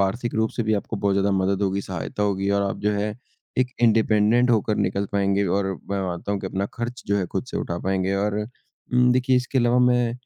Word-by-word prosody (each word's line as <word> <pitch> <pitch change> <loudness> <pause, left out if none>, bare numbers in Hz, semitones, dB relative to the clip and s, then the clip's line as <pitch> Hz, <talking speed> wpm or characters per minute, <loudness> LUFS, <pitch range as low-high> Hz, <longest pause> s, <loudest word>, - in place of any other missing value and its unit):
आर्थिक 115 +5 -1
रूप 110 0 +1
से 120 - +1
भी 110 0 +1
आपको 105 +2 -3
बहुत 100 -1 +1
ज़्यादा 100 +1 +2
मदद 95 +1 +1
होगी, 95 0 0
सहायता 95 +2 -4
होगी 100 -1 0
और 100 0 +2
आप - - -5
जो 105 0 +1
है 105 +1 -1 0.5
एक 125 0 +2
इंडिपेंडेंट 115 +1 +4
होकर 110 -2 +2
निकल 100 +2 0
पाएँगे 100 0 +1
और 95 +2 +1 0.2
मैं 100 - 0
मानता 90 +3 -3
हूँ 100 - -2
कि - - -4
अपना 95 +1 -2
खर्च 120 +1 -5
जो 100 - +1
है 90 - -1
ख़ुद 95 - -2
से - - -3
उठा 85 0 -3
पाएँगे। 95 +1 0
और 105 +1 0 0.5
उम, 125 0 +4
देखिए 130 +1 +2
इसके 125 +1 0
अलावा 120 0 +3
मैं 125 -1 +3
100 Hz, 230 wpm, -23 LUFS, 100-120 Hz, 0.5 s, इंडिपेंडेंट